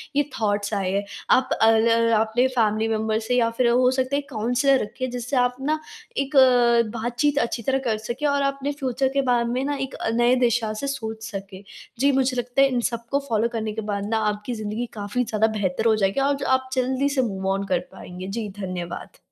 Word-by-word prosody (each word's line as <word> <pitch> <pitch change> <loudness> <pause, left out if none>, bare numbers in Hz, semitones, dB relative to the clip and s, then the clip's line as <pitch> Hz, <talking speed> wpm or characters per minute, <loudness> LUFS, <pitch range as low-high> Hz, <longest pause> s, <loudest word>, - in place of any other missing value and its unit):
ये 290 - +4 0.2
थॉट्स 205 -1 0
आए 195 -2 0
हैं। 200 +1 0 0.3
आप 260 - +4
अ 220 - +7
ल 230 +1 +3
अपने 225 +4 +2
फैमिली 225 -3 +1
मेंबर 220 0 0
से 230 +2 -1
या 230 -2 +3
फिर 240 +1 +1
अ, - - +4
हो 250 +1 +4
सकता 260 +1 0
है - - +2
एक 285 - -10
काउंसलर 245 +3 +2
रखें, 255 +5 -4
जिससे 245 +2 -4
आप 245 0 +2
ना 305 +3 0 0.4
एक 275 +2 -2 0.6
बातचीत 245 +5 0
अच्छी 235 -1 -2
तरह 270 +4 +1
कर 220 -3 +1
सकें 235 +6 -4
और 285 0 +1
अपने 275 0 -1
फ्यूचर 270 -2 -1
के 275 - +2
बारे 245 -3 +2
में 255 +2 -1
ना 290 0 -1
एक - - -18
अ, - - -3
नए 240 +2 +4
दिशा 230 -2 0
से 280 - -2
सोच 220 -5 -5
सकें। 195 -1 -8 0.4
जी, 280 +1 +4
मुझे 260 -1 +1
लगता 245 +2 0
है 275 - +7
इन 250 -2 0
सबको 235 +4 -2
फॉलो 225 0 +2
करने 220 -2 -2
के 220 - -4
बाद 200 0 -2
ना, 225 - +1
आपकी 210 +4 -4
ज़िन्दगी 215 +1 -3
काफ़ी 205 +3 -2
ज़्यादा 220 -1 +1
बेहतर 190 +2 -1
हो 220 - +4
जाएगी, 195 +3 +1
और 280 +1 +2
ज 275 - -6
आप 260 0 -13
जल्दी 260 +2 +1
से 280 -2 +1
मूव 195 -5 -3
ऑन 195 0 -2
कर 180 -2 +1
पाएँगे। 180 +1 -9
जी, 215 +2 -3
धन्यवाद। 180 -3 -6
235 Hz, 225 wpm, -23 LUFS, 215-260 Hz, 0.6 s, अ